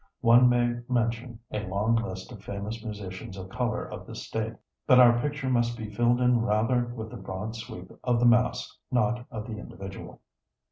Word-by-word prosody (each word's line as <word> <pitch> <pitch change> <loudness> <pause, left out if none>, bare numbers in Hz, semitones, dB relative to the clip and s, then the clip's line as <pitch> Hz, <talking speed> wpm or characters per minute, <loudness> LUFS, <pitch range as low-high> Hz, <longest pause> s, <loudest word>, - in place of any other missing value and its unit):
One 120 +1 +7
may 120 0 +2
mention 115 -1 0
a 105 - -1
long 105 +5 +1
list 95 -2 -3
of 105 -5 -11
famous 105 +3 -5
musicians 100 -3 -7
of 95 0 -7
color 120 0 -1
of - - -9
the - - -8
State, - - -3 0.3
but 130 - +7
our 120 -1 +7
picture 145 -1 -2
must 120 -2 +1
be 110 -2 -6
filled 120 +3 +3
in 125 -1 +4
rather 115 +3 +2
with 115 -2 -7
the 125 - -7
broad 95 +3 -5
sweep 110 -5 -8
of 120 -2 +2
the 120 - +3
mass, 120 +1 +3
not 125 -1 +1
of 110 -5 -5
the 110 -2 -6
individual. 95 -2 -9
115 Hz, 185 wpm, -28 LUFS, 105-120 Hz, 0.3 s, One